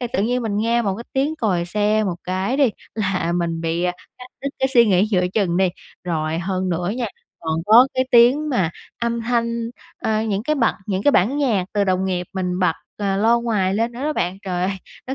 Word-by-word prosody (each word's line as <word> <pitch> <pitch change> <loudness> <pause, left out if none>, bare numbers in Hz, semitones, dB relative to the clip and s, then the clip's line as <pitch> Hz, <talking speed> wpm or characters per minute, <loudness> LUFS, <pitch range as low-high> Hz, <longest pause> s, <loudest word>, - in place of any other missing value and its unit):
thì 245 - -2
tự 200 - +1
nhiên 245 +3 0
mình 215 -3 -2
nghe 230 +3 +1
một 200 -4 0
cái 235 - -8
tiếng 280 +4 0
còi 190 - 0
xe 210 +4 +1
một 180 -4 -2
cái 190 +7 -1
đi 275 -4 +4 0.2
là 190 -5 -1
mình 170 -1 -1
bị, 165 +1 -1
ờ, 180 - +1 0.3
cắt 250 - -9 0.2
đứt 280 - -1
cái 265 - +1
suy 235 -1 +7
nghĩ 195 0 +3
giữa 180 -3 +2
chừng 190 -6 +1
đi. 190 0 +3 0.4
Rồi 160 -2 -1
hơn 185 +1 -2
nữa 175 +1 -1
nha, 245 -2 -1 0.3
còn 160 -1 -2
có 230 +4 +8
cái 260 - +2
tiếng 255 +5 +5
mà 190 - +1 0.3
âm 235 0 0
thanh, 235 0 -1 0.3
ơ, 220 0 +1
những 210 -2 -1
cái 305 +6 0
bật 245 -6 +2
những 190 -1 -1
cái 290 - +5
bản 235 +8 +3
nhạc 230 -10 +1
từ 205 -1 +2
đồng 185 -1 +1
nghiệp 180 -2 -2
mình 180 -1 -2
bật, 180 -3 +3 0.2
ờ, 200 -2 -1
loa 225 +4 +4
ngoài 215 -5 0
lên 230 +3 0
nữa 240 - -8
đó 305 +1 0
bạn. 185 -8 -2
Trời 180 -2 -2
ơi! 185 - +1 0.4
Nó 265 - -3
205 Hz, 235 wpm, -21 LUFS, 180-235 Hz, 0.4 s, có